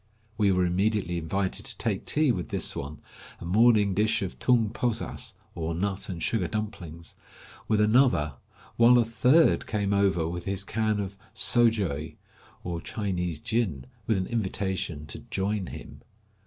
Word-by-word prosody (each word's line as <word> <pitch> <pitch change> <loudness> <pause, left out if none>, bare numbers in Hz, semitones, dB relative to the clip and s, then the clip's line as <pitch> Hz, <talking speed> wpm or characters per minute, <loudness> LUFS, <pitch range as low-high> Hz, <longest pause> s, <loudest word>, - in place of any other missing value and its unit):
We 105 -3 +3
were 90 -1 +2
immediately 95 -1 0
invited 95 +4 -2
to - - -2
take - - -2
tea 150 -3 +3
with 90 -6 -3
this - - 0
one, 70 +2 -6 0.4
a - - -8
morning 105 +1 +4
dish 110 +2 +1
of 95 - -6
tung 115 -4 +3
posas, 120 -1 -3 0.2
or 80 0 -3
nut 95 +3 -2
and 85 -3 -5
sugar 105 -7 0
dumplings, 85 -6 -6 0.5
with 110 -1 +2
another, 105 - +3 0.4
while 120 +1 +7
a 120 - +4
third 125 +8 +3
came 100 -3 0
over 95 -5 +2
with 85 +1 -5
his 100 0 -2
can 110 0 0
of 100 -1 -5 0.2
sojeu, 105 - +2 0.5
or 85 -1 -4
Chinese 90 -6 -3
gin, 95 - -1 0.2
with 110 - +2
an 95 - -1
invitation 95 -8 -2
"to - - -8
join 100 -1 -1
him." - - -10
100 Hz, 155 wpm, -27 LUFS, 90-110 Hz, 0.5 s, while